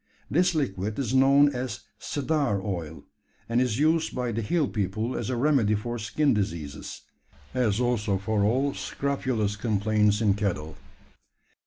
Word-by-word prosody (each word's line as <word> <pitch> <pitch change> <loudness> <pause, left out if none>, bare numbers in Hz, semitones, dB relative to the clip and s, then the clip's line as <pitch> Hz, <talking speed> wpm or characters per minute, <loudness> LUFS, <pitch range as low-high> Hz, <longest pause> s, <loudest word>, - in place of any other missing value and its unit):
This 175 +2 +3
liquid 105 -7 -2
is 130 -3 -2
known 140 +2 +5
as 125 0 -4 0.2
"cedar 145 -7 0
oil;" 85 -6 -5 0.4
and 115 +2 +2
is 125 -4 0
used 155 +3 +2
by 125 -2 -1
the 115 +1 -2
hill 150 +6 +1
people 110 +4 -2
as - - -3
a 130 - 0
remedy 125 -6 +3
for 120 +3 -4
skin 140 +6 +1
diseases 85 -8 -4 0.5
as 120 -4 +1
also 115 -5 +1
for 100 +2 0
all 130 +7 +2
scrofulous 130 -7 -2
complaints 105 0 +1
in 105 -3 +3
cattle. 90 -7 -2
115 Hz, 145 wpm, -26 LUFS, 105-135 Hz, 0.5 s, known